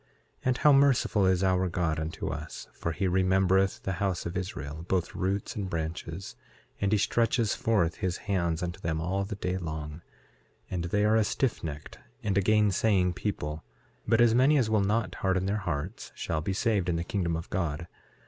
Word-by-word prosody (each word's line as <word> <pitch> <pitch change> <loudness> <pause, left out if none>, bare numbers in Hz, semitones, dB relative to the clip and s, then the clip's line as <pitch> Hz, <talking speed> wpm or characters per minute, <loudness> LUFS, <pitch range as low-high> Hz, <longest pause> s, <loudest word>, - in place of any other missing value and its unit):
6:4 - - -37 0.4
And 125 -1 +2
how 150 - +6
merciful 135 -8 +4
is 95 0 +2
our 95 -1 +2
God 85 -2 0
unto 80 +1 -4
us, 75 +1 -6
for 85 - -3
he 95 +4 -1
remembereth 95 +1 +2
the 95 - -1
house 95 -3 0
of 85 - -4
Israel, 80 -5 -5
both 90 -3 0
roots 95 +5 -2
and 100 -4 -3
branches; 85 +2 -4 0.4
and 100 0 +1
he 105 - +4
stretches 115 +1 +2
forth 100 -8 +1
his 95 -3 -1
hands 85 -4 0
unto 85 -1 -4
them 80 -1 -2
all 95 +4 -1
the 105 +1 -5
day 90 -2 -2
long; 80 -2 -5 0.7
and 85 -2 -2
they 105 +4 +1
are 110 +1 +4
a - - +4
stiffnecked 80 - -2 0.3
and 100 -3 0
a 100 - +4
gainsaying 100 -2 +3
people; 80 -7 -3 0.4
but 115 +1 +3
as 120 -1 +6
many 135 +5 +5
as 115 -5 +1
will 110 -2 +3
not 105 +3 0
harden 95 -1 +1
their 100 +2 0
hearts 85 0 -4
shall 80 -1 -2
be 90 - -2
saved 100 -2 +1
in 85 - +1
the 85 - -1
kingdom 85 -2 -1
of 80 +1 -5
God. 85 -2 -2
95 Hz, 190 wpm, -29 LUFS, 85-105 Hz, 0.7 s, how